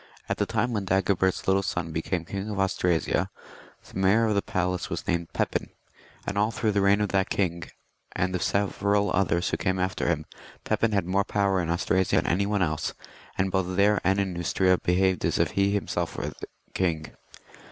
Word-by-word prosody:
At - - -1
the - - 0
time 115 +2 0
when 105 -3 -1
Dagobert's 95 0 +1
little 95 0 +4
son 85 -3 -3
became 80 +2 -2
king 100 +3 -4
of 100 -2 -3
Austrasia, 90 -3 +1 0.6
the - - -6
Mayor 100 +5 +4
of 110 - +1
the 100 - +2
Palace 90 -1 -2
was - - -4
named 85 -1 -1
Pepin; - - -1 0.6
and 100 - -2
all 105 +1 +3
through 110 -1 0
the 100 -1 +1
reign 100 +1 +4
of 105 - 0
that 95 0 +1
king, 85 -4 -1 0.5
and 90 +1 -1
of 90 - -1
several 100 +1 +1
others 90 -2 +1
who - - 0
came 95 0 0
after 95 0 -1
him, 80 -3 0 0.4
Pepin 115 - +1
had 100 -3 +1
more 95 +2 +1
power 100 -2 +1
in 85 - -3
Austrasia 95 +2 +1
than - - +2
any 100 +4 +1
one 105 -2 +1
else, 80 -3 -2 0.4
and 95 0 +1
both 95 -1 0
there 100 0 +4
and 95 +2 +2
in 95 -2 -1
Neustria 90 +1 +2
behaved 95 0 +1
as - - +1
if - - +1
he 100 0 +2
were 100 - 0
himself 100 - -2
the - - -4 0.4
king. 80 -5 -1
95 Hz, 200 wpm, -26 LUFS, 90-100 Hz, 0.6 s, little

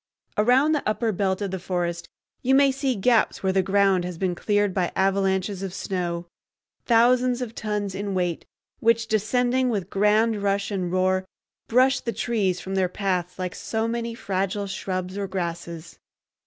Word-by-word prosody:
Around 250 +8 +4
the 300 -2 +1
upper 220 +1 0
belt 190 0 -1
of 195 - -3
the 190 - -3
forest 175 -1 -3 0.3
you 265 +1 +3
may 275 0 +5
see 270 -1 -1
gaps 225 +2 +2
where 190 0 +1
the 190 - +3
ground 195 -1 +3
has 180 -1 -5
been 185 0 0
cleared 205 +2 +1
by 180 -2 0
avalanches 195 0 +1
of 195 -1 -5
snow, 175 -2 -3 0.6
thousands 245 +1 +4
of 245 -3 -4
tons 210 -3 -3
in 200 0 -3
weight, 175 -2 -1 0.4
which, 230 0 +3
descending 245 +4 +1
with 205 -6 -2
grand 210 +2 +2
rush 200 0 0
and 185 -3 -2
roar, 185 0 +1 0.4
brush 255 +3 +4
the 235 - -4
trees 200 -7 0
from 190 - -6
their 190 -2 +1
paths 180 -2 -2
like 185 -1 -3
so 220 0 -2
many 230 0 -3
fragile 195 -1 -2
shrubs 185 0 -4
or 200 - -2
grasses. 170 -2 -5
200 Hz, 170 wpm, -24 LUFS, 185-230 Hz, 0.6 s, may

